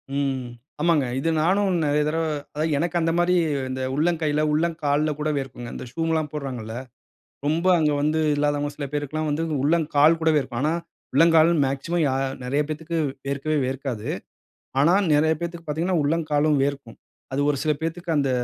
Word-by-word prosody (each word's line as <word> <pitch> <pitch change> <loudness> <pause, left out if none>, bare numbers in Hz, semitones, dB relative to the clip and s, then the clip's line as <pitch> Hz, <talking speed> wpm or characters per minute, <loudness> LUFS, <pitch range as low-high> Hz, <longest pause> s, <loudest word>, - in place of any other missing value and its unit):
ம். 135 -2 -1 0.4
ஆமாங்க. 160 -5 +3
இது 165 - 0
நானும் 190 +3 +2
நிறைய 150 0 +2
தடவ 165 +1 0 0.3
அ - - +1 0.2
எனக்கு 175 +4 0
அந்தமாரி 170 +2 +2 0.4
இந்த 130 0 -4
உள்ளங்கைல 155 0 +1
உள்ளங்கால்ல 155 -2 +1
கூட 155 +1 0
வியர்க்குங்க. 125 -3 -5
இந்த - - -6
ஷூம்லாம் 160 -2 -1
போடுகிறாகள்ல. 125 -6 -5 0.7
ரொம்ப 165 +4 +1
அங்க 150 -2 +2
வந்து 155 +2 +1
இல்லாதவங்க 145 0 0
சில 145 - -4
பேருக்குல்லாம் 150 +1 -2
வந்து 150 +3 -1 0.2
உள்ளங்கால் 155 0 +3
கூட 160 - +3
வியர்க்கும். 130 -4 -1
ஆனா, 155 +2 +2 0.4
உள்ளங்கால் 165 +2 +5
மேக்ஸிமம் 140 +6 -1
யா 135 - +1 0.3
நிறைய 140 +4 0
பேத்துக்கு 160 +2 -4 0.3
வியர்க்கவே 140 +3 -1
வியர்க்காது. 130 -4 -4 0.7
ஆனா, 165 +6 +5 0.2
நிறைய 155 +2 +4
பேருக்கு 170 -1 -5
பார்த்தீங்கன்னா 165 +4 0
உள்ளம் 160 +2 0
காலும் 150 0 +3
வியர்க்கும். 140 -4 -3 0.3
அது 135 - 0
ஒரு 140 - 0
சில 155 - +2
பேத்துக்கு 165 0 -2
அந்த 140 -2 +1
150 Hz, 155 wpm, -24 LUFS, 140-165 Hz, 0.7 s, உள்ளங்கால்